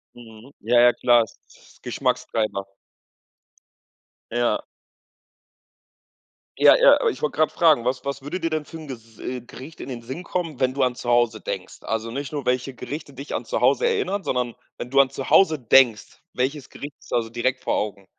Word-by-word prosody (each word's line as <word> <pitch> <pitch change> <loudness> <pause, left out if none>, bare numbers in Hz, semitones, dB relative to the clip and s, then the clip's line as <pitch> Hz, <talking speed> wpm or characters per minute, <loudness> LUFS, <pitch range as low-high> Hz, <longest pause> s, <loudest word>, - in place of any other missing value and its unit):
Mhm. 115 +2 -14
Ja, 120 +3 +3
ja, 120 0 +6
klar, 120 -2 +4
ist 110 - -13
ist - - -22
Geschmackstreiber. 105 -3 -1 1.7
Ja. 120 0 0 1.9
Ja, - - +8
ja, - - +8
aber 470 - +3
ich - - -6
wollte 150 - -1
gerade 155 0 +2
fragen, 155 -8 +4
was 125 +2 -2
was 140 0 -3
würde 145 +7 -5
dir 165 -1 -1
denn 155 -1 -2
für 165 +2 -10
'n 155 -2 -10
Ges 115 -4 -10 0.3
Gericht 135 +6 -11
in - - -7
den 120 -2 -6
Sinn 130 +9 -7
kommen, 170 -5 -3
wenn 130 0 +2
du 135 0 +1
an 125 -1 +1
zu 120 - -5
Hause 120 -2 +2
denkst? 90 -2 -6
Also, 110 +1 -3
nicht 140 +3 -5
nur, 145 -3 -4
welche 125 +1 0
Gerichte 145 +4 -7
dich 140 +2 -6
an - - -3
zu - - -2
Hause 480 - +3
erinnern, 410 - -1
sondern 125 -5 -1 0.2
wenn 120 - -6
du 140 +1 +6
an 135 - +1
zu 135 - -6
Hause 160 -6 +5
denkst, 120 -2 +3
welches 135 +2 -2
Gericht 145 0 -9
ist - - -18
also 115 -1 0
direkt 120 +3 -1
vor - - -1
Augen? 100 -2 -3
130 Hz, 190 wpm, -23 LUFS, 120-150 Hz, 1.9 s, Ja